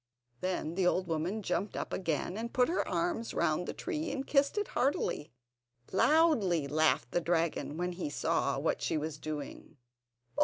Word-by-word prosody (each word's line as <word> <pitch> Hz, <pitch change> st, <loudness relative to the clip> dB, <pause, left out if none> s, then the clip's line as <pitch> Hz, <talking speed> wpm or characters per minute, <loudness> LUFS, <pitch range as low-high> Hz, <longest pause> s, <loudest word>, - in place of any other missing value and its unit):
Then 180 Hz, -2 st, -2 dB
the 180 Hz, 0 st, +2 dB
old 185 Hz, +1 st, +2 dB
woman 175 Hz, +6 st, -2 dB
jumped 190 Hz, +3 st, -1 dB
up -, -, -4 dB
again 175 Hz, 0 st, -1 dB
and 230 Hz, +2 st, -4 dB
put 250 Hz, +2 st, +3 dB
her 350 Hz, -, 0 dB
arms 335 Hz, -10 st, -1 dB
round 170 Hz, +1 st, +1 dB
the -, -, -1 dB
tree, 325 Hz, -4 st, -3 dB
and 275 Hz, -1 st, -3 dB
kissed 280 Hz, +7 st, +2 dB
it 415 Hz, -, 0 dB
heartily. 255 Hz, -, 0 dB, 0.6 s
Loudly 220 Hz, -, +4 dB
laughed 150 Hz, -5 st, +2 dB
the 175 Hz, -, +1 dB
dragon 165 Hz, -2 st, 0 dB
when 180 Hz, +1 st, -1 dB
he 175 Hz, -3 st, -4 dB
saw 145 Hz, -, 0 dB
what -, -, 0 dB
she -, -, 0 dB
was 150 Hz, 0 st, -4 dB
doing. 150 Hz, 0 st, -6 dB
180 Hz, 165 wpm, -32 LUFS, 160-255 Hz, 0.6 s, Loudly